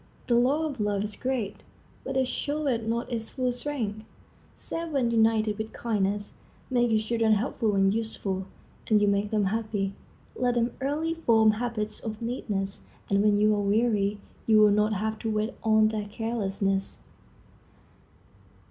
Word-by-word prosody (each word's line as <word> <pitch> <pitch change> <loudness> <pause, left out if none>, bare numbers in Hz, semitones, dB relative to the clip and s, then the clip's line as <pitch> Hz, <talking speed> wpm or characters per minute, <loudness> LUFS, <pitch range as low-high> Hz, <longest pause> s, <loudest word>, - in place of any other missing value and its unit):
The 240 - +1
law 265 +7 +3
of 280 -5 -4
love 205 -1 0
is 210 -1 -3
great, 245 -6 -2 0.5
but - - -3
it 260 -1 +2
showeth 285 -4 -1
not 235 +2 -2
its 225 -2 -3
full 255 -1 -1
strength, 240 -5 -3 0.5
save 335 0 -4
when 250 -4 +1
united 220 -2 +2
with 220 0 -4
kindness. 205 -2 -1 0.4
Make 240 -1 +3
your 220 -1 +3
children 225 0 +2
helpful 215 -1 0
and 195 0 +3
useful, 200 -4 -2 0.4
and 215 -2 +5
you 205 - +3
make 200 +1 +1
them 210 -2 +1
happy. 205 -1 -1 0.4
Let 245 -1 +1
them 235 0 +1
early 305 +4 0
form 225 -9 +4
habits 215 -1 -3
of 215 -1 -5
neatness, 205 -5 -3 0.2
and 200 0 +4
when 205 -1 +3
you 215 0 +4
are 205 - 0
weary 205 -1 +1 0.3
you 220 -1 +6
will 210 -1 +7
not 210 +1 +2
have 215 +2 -2
to 225 - -3
wait 215 +1 -1
on 220 -1 +4
their 215 -1 -3
carelessness. 200 -3 -1
220 Hz, 160 wpm, -27 LUFS, 205-240 Hz, 0.5 s, will